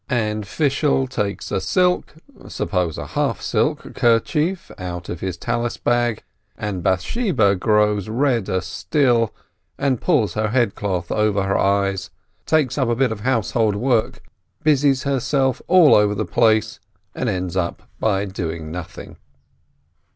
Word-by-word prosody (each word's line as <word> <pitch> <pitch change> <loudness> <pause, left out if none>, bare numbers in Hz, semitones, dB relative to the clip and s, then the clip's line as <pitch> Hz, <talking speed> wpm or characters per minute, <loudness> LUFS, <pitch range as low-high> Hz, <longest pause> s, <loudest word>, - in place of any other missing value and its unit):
And 110 -4 -1
Fishel 140 +1 +1
takes 105 -6 -3
a 95 - 0
silk 180 - +1 0.3
(suppose 90 -5 -2
a - - -5
half - - -1
silk!) - - -1
kerchief 150 +10 +1
out 90 -1 -6
of 85 - -5
his 95 -1 -4
Tallis 120 +3 -2
bag, 120 -2 0 0.3
and 100 -3 -4
Bath 95 -1 +1
sheba 155 - +1
grows 105 0 +1
redder 115 -6 0
still, 115 - +1 0.5
and 135 -4 0
pulls 115 - +2
her 110 0 0
head 120 -2 +1
cloth 90 -4 -3
over 105 -2 +1
her 95 0 0
eyes, 100 -1 +1 0.4
takes 150 -4 +1
up 130 -3 +1
a 120 - +1
bit 130 -1 +1
of 110 - -4
household 115 -2 +1
work, 120 +1 0 0.4
busies 140 -3 +3
herself 135 -1 0
all 175 -4 +6
over 105 0 +4
the 110 +1 -2
place, 110 +3 +2 0.3
and 125 - -2
ends 90 -3 -3 0.4
by 100 -2 +1
doing 85 -5 -5
nothing. 85 -1 -8
110 Hz, 140 wpm, -21 LUFS, 95-130 Hz, 0.5 s, all